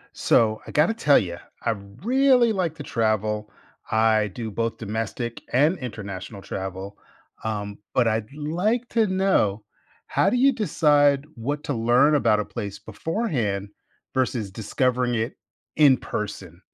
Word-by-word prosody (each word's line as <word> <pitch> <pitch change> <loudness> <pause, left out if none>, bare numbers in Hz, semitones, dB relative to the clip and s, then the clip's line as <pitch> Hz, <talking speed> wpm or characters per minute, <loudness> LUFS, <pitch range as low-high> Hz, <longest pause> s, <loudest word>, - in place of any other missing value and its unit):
So, 110 -1 +3
I - - -8
gotta 155 +8 +3
tell 150 -11 +4
ya, 85 -4 -3 0.2
I 115 - +1 0.3
really 255 -1 +4
like 180 -6 -1
to - - -7
travel. 110 -3 -1 0.4
I 110 -1 +3
do 110 +3 -6
both 115 +2 -2
domestic 115 +2 -4
and 150 +8 +3
international 100 -5 -7
travel, 95 +1 -6 0.5
um, 105 -2 -3 0.2
but 125 - +3
I'd 110 -1 0
like 180 +11 -1
to 225 -2 +3
know 185 - +1 0.4
how 195 - +2
do 250 - +1
you 270 +2 +5
decide 145 - +3
what 145 +6 -4
to - - -2
learn 120 +6 +4
about 115 -7 +3
a 105 - -2
place 105 -4 -6
beforehand 110 - -2 0.4
versus 125 -5 0
discovering 120 +4 0
it 115 +2 -1 0.4
in 145 -4 +6
person? 95 -7 -6
120 Hz, 140 wpm, -24 LUFS, 105-150 Hz, 0.5 s, in